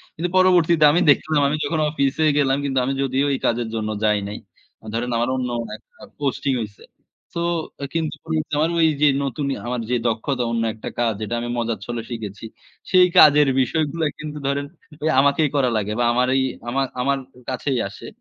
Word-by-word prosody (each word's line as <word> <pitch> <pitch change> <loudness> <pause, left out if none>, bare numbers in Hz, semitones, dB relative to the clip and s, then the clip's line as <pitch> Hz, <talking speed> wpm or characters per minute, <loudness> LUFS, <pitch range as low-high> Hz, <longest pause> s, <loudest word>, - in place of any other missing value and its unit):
কিন্তু 175 +3 -2
পরবর্তীতে 170 -4 +5
আমি 175 - +2
দেখলাম, 145 +1 +3
আমি 150 - -1
যখন 165 - -1
অফিসে 140 +1 0
গেলাম। 135 -1 +2
কিন্তু 135 -1 -2
আমি 135 - -1
যদিও 135 +2 0
এই 135 - -2
কাজের 120 0 0
জন্য 110 -1 -2
যাই 105 -1 +3
নাই। 105 - -6 0.5
আ - - -16
ধরেন 120 +2 -2
আমার 120 +2 0
অন্য 125 -1 -2 0.3
একটা - - -19 0.3
পোস্টিং 140 -1 -1
হইছে। 105 -1 -8 0.5
সো - - -3 0.4
আ - - -1
কিন্তু 160 -2 -1 0.4
আমার 155 +2 +2
ওইযে 150 -2 +3 0.2
নতুন 140 +1 -3
ইয়া, - - -3
আমার 125 -1 -2
যে, 125 - +1
দক্ষতা 120 +3 -1
অন্য 115 -1 0
একটা 110 - -7
কাজ, 115 -2 +2
যেটা 110 +2 -2
আমি 120 0 -4
মজার 115 -3 -2
ছলে 120 -1 -4
শিখেছি। 110 -3 -6 0.5
সেই 185 -1 +6
কাজের 150 -1 +7
বিষয়গুলা 160 +3 -1
কিন্তু 150 -1 -6
ধরেন 140 +1 -1 0.4
এই 160 - +2
আমাকেই 145 +2 +3
করা 130 -3 +3
লাগে। 105 0 -2
বা 120 - +2
আমার 125 +1 +2
ঐ, - - +4 0.3
আমার, 135 +2 0
আমার 140 +2 +1 0.3
কাছেই 130 0 -1
আসে। 100 - -11
135 Hz, 190 wpm, -22 LUFS, 120-150 Hz, 0.5 s, কাজের